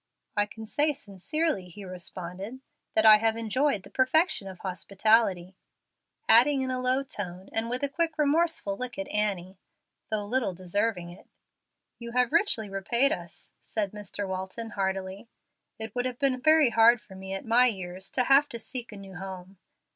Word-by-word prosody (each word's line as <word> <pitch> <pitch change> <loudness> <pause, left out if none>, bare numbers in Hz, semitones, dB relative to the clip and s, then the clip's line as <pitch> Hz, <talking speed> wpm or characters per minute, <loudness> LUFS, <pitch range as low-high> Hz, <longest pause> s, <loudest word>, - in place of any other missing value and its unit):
"I 205 -1 +2
can 220 +1 -10
say 295 +7 +1
sincerely," 265 - -3
he 195 +3 -10
responded, 185 +5 -7 0.4
"that 220 - +3
I 215 -1 +10
have 225 +1 0
enjoyed 230 0 0
the 195 - -15
perfection 260 - +2
of 190 -1 -9
hospitality;" 195 0 +1 0.7
adding, 265 +5 +6
in 260 0 -2
a 255 - -2
low 255 +2 +1
tone 190 -7 -7
and 225 +1 -1
with 250 +3 -3
a - - +2
quick, 325 +2 -1
remorseful 305 -7 +1
look 250 +3 -6
at 195 - -4
Annie, 195 -3 -2 0.5
"though 215 -2 -2
little 220 -4 -1
deserving 185 0 -2
it." 175 - -15 0.7
"You 235 -1 -8
have 250 -1 +3
richly 235 - +2
repaid 235 +8 +1
us," 170 -1 -6
said 205 -3 -2
Mr. 205 -1 -4
Walton, 190 +4 -5
heartily. 190 +1 -3 0.5
"It 220 -1 -6
would 245 0 -1
have 250 -1 -3
been 260 -2 +1
very 310 -3 +5
hard 230 +1 +6
for 210 - -16
me 190 0 -7
at 195 - -7
my 240 +2 +5
years 185 -3 -3
to 255 - +2
have 275 +3 +5
to 235 - -6
seek 240 0 -4
a 210 - -9
new 195 -2 -10
home. 190 0 -9
220 Hz, 175 wpm, -27 LUFS, 190-255 Hz, 0.7 s, I